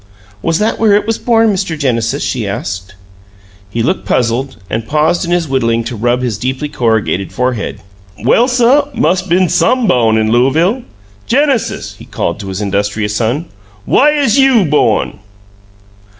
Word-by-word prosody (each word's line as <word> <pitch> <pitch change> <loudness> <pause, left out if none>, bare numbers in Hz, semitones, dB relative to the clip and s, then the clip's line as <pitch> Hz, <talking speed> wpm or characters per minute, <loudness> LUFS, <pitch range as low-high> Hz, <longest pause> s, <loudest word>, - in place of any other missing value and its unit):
"Was 165 -1 0
that 215 +3 -1
where 220 -2 +4
it 205 - +2
was 225 0 -2
born, 225 -3 +2
Mr. 185 -4 -2
Genesis?" 125 -1 -1
she 120 -5 -2
asked. 95 -1 -5 0.7
He 115 +3 -2
looked - - -1
puzzled, 125 +3 -1
and 110 +2 -4
paused 155 +5 +1
in - - -5
his 175 -2 0
whittling 115 -4 0
to 120 - -5
rub 120 +3 0
his 115 -5 -2
deeply 130 +5 -3
corrugated 110 -7 -1
forehead. 125 -3 -2 0.4
"Well, 235 - +3
suh, 255 +3 +3
mus' 180 -2 +1
been 185 0 +1
some 255 +7 +2
bawn 115 - +3
in 110 0 +1
Looavle. 160 - +2 0.5
Genesis," 275 -2 0
he - - -11
called 85 +4 -3
to 100 - -7
his 95 +1 -4
industrious 105 +1 -1
son, 120 +9 -1 0.4
"whaih 300 +2 +3
'uz 255 0 +2
YOU 260 -7 +4
bawn?" 135 -10 +1
135 Hz, 160 wpm, -14 LUFS, -, 0.7 s, where